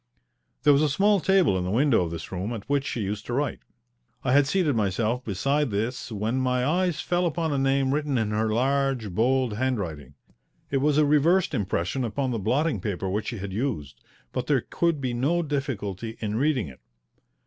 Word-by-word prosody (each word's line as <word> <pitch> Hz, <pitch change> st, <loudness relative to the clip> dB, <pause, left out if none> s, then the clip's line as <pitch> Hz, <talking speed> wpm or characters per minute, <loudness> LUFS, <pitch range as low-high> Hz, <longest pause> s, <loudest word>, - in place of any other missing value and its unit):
There 145 Hz, -, +6 dB
was 140 Hz, -, +4 dB
a 155 Hz, -, +3 dB
small 200 Hz, +7 st, +3 dB
table 185 Hz, -, +3 dB
in -, -, -2 dB
the 90 Hz, -, -3 dB
window 120 Hz, +1 st, +3 dB
of 85 Hz, -, -3 dB
this 85 Hz, 0 st, -7 dB
room 95 Hz, +5 st, -3 dB
at 110 Hz, -3 st, -7 dB
which 140 Hz, 0 st, 0 dB
she 120 Hz, -, -3 dB
used 100 Hz, +1 st, -3 dB
to 120 Hz, -, -3 dB
write. 140 Hz, +1 st, -1 dB, 0.6 s
I 125 Hz, -, +1 dB
had 140 Hz, 0 st, +5 dB
seated 155 Hz, -4 st, +1 dB
myself 110 Hz, +4 st, 0 dB
beside 135 Hz, +8 st, 0 dB
this 115 Hz, +5 st, -3 dB
when 110 Hz, +4 st, -1 dB
my 125 Hz, -1 st, +1 dB
eyes 175 Hz, +2 st, +1 dB
fell 175 Hz, 0 st, +1 dB
upon 165 Hz, -2 st, -1 dB
a 140 Hz, -, 0 dB
name 135 Hz, 0 st, +2 dB
written 145 Hz, -2 st, 0 dB
in 110 Hz, -2 st, 0 dB
her 110 Hz, +1 st, 0 dB
large, 130 Hz, -2 st, 0 dB
bold 120 Hz, +2 st, +1 dB
hand 130 Hz, 0 st, 0 dB
writing. 75 Hz, -8 st, -6 dB, 0.6 s
It 140 Hz, -, +2 dB
was 145 Hz, +2 st, +2 dB
a 155 Hz, -, +5 dB
reversed 165 Hz, +6 st, +3 dB
impression 100 Hz, +5 st, -1 dB
upon 130 Hz, +3 st, -1 dB
the 115 Hz, -, -2 dB
blotting 125 Hz, -, 0 dB
paper 95 Hz, -1 st, -3 dB
which 105 Hz, +2 st, -2 dB
she 120 Hz, -, -3 dB
had 100 Hz, -1 st, -6 dB
used, 100 Hz, -, -3 dB, 0.3 s
but -, -, -3 dB
there -, -, +3 dB
could 170 Hz, -4 st, -1 dB
be 125 Hz, -2 st, -1 dB
no 150 Hz, +9 st, +1 dB
difficulty 115 Hz, -, -3 dB
in 105 Hz, -1 st, -2 dB
reading 130 Hz, -, +1 dB
it. 65 Hz, -, -12 dB
125 Hz, 205 wpm, -26 LUFS, 105-145 Hz, 0.6 s, There